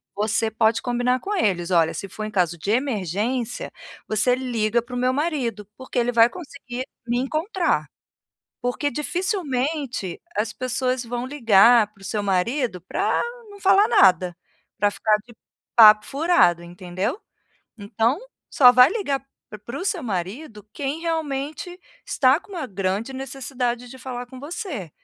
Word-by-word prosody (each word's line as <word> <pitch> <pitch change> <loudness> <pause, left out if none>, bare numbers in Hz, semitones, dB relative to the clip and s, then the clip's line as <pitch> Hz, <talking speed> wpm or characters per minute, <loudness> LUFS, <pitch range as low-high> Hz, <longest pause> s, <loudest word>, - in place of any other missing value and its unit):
você 215 +2 0
pode 225 +1 +2
combinar 245 +1 0
com 415 +8 -3
eles, 185 - 0
"Olha, 165 -3 +3 0.2
for 215 - -6
em 215 - -4
caso 175 -4 0
de 195 - -3
emergência 230 - -1 0.4
você 235 +4 +2
liga 235 -3 0
para 245 +1 -10
o 245 - -2
meu 255 +1 +2
marido, 260 -9 -2
porque 260 -1 -5
ele 245 +1 +1
vai 230 0 +6
conseguir 260 -5 -7 0.2
me 240 +1 0
encontrar", 325 - 0 0.7
Porque 245 +4 -1
dificilmente 295 - -2 0.2
as 215 +1 -1
pessoas 255 +1 -2
vão 240 +1 -4
ligar 230 -4 +5
para 200 - -25
o - - -12
seu 205 +1 -2
marido 200 +3 0
para 175 - -1 0.3
não 405 0 -13
falar 390 +2 +5
nada, 180 -2 +4 0.4
para 205 0 +3
ficar 210 +1 +2
de 235 - -15 0.4
papo 215 -2 +8
furado, 280 - +3
entendeu. 185 - -4 0.6
Então 225 +5 0 0.3
só 250 -3 +7
vai 250 +2 +7
ligar 360 -10 -1
para - - -31
o - - -58 0.3
para 240 +3 -6
o 365 - -4
seu 390 -4 -1
marido 210 - -5
quem 285 +3 -3
realmente 315 +1 -3 0.3
está 265 +3 +3
com 405 - -19
uma 330 -6 -3
grande 195 +3 -2
necessidade 255 -2 -4
de 260 - -11
falar 250 -1 -6
com 255 +1 -12
você, 295 - -6
245 Hz, 155 wpm, -23 LUFS, 210-275 Hz, 0.7 s, papo